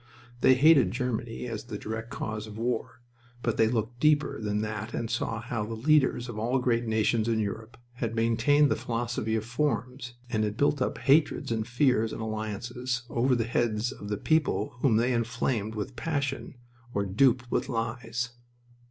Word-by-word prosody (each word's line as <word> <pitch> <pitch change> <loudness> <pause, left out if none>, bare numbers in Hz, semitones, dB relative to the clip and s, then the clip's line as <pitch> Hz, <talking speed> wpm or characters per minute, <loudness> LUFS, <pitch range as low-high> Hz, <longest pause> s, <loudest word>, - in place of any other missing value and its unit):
They 130 - +6
hated 140 - +6
Germany 120 0 -3
as 115 -2 -5
the 110 -3 -5
direct 110 +2 -5
cause 110 -2 -4
of 105 0 -9
war, 120 +1 -2 0.4
but 115 - 0
they 110 - +5
looked 115 +1 -2
deeper 150 -4 +2
than 105 0 -1
that 110 +1 -4
and 115 -1 -3
saw 115 -1 -1
how 115 -1 -3
the 115 +2 -5
leaders 130 -1 +3
of 115 -3 -5
all 120 +4 +1
great 120 -2 +1
nations 110 +1 +1
in 115 -1 +1
Europe 110 +2 -4 0.2
had 115 -2 -3
maintained 120 +6 +3
the - - +3
philosophy 115 -1 -2
of 110 -1 -2
forms 125 -1 -2
and 110 -3 0
had 105 0 -2
built 145 0 +2
up - - 0
hatreds 145 -3 +3
and 110 -1 -1
fears 125 -3 +2
and - - -5
alliances 115 +3 -3
over 125 +2 +2
the 120 - +1
heads 115 0 0
of 100 - -8
the 105 - -1
peoples 145 -9 +1
whom 125 -6 +4
they 120 +3 +2
inflamed 115 -2 -1
with 110 +5 -4
passion 140 -4 -2 0.4
or 100 0 +1
duped 125 +5 +2
with - - 0
lies. 115 +1 -2
115 Hz, 180 wpm, -28 LUFS, 110-125 Hz, 0.4 s, They